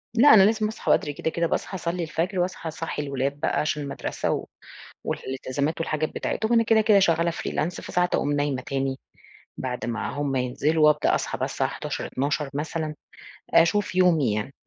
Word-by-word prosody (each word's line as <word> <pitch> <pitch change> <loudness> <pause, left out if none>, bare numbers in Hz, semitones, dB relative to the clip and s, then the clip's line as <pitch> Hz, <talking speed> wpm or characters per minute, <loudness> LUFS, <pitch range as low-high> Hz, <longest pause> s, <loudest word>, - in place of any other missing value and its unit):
لأ، 255 +4 +7
أنا 200 -3 +8
لازم 215 +1 +2
أصحى 220 - -2
بدري 145 - +2
كده، 155 - -2
كده، 170 +1 0
باصحى 190 - -2
أصلّي 175 -1 -2
الفجر 175 +4 -2
وأصحى 180 -1 -2
أصحّي 160 -1 -4
الولاد 140 0 -2
بقى - - 0
عشان 150 -1 -1
المدرسة 140 -1 -3
و - - -2 0.6
والالتزامات 135 +4 -3
والحاجات 155 -1 -1
بتاعتهم 220 - -2
وأنا 230 -1 +5
كده، 225 -1 +4
كده 215 -1 +5
شغالة 170 -3 +3
freelance، 165 0 -2
فساعات 180 0 0
أقوم 145 - +1
نايمة 145 -2 0
تاني 135 -1 -2 0.6
بعد 125 -1 -3
ما 115 -3 -2
هُم 145 -2 -2
ينزْلوا 145 +5 +2
وأبدأ 150 0 +3
أصحى - - -2
بقى - - 0
الساعة - - -1
11:00، - - -4
12:00 140 +2 -2
مثلًا، 155 +1 -3 0.6
أشوف 185 +3 +3
يومي 165 - +3
يعني. 110 +6 -3
155 Hz, 175 wpm, -25 LUFS, 140-180 Hz, 0.6 s, أنا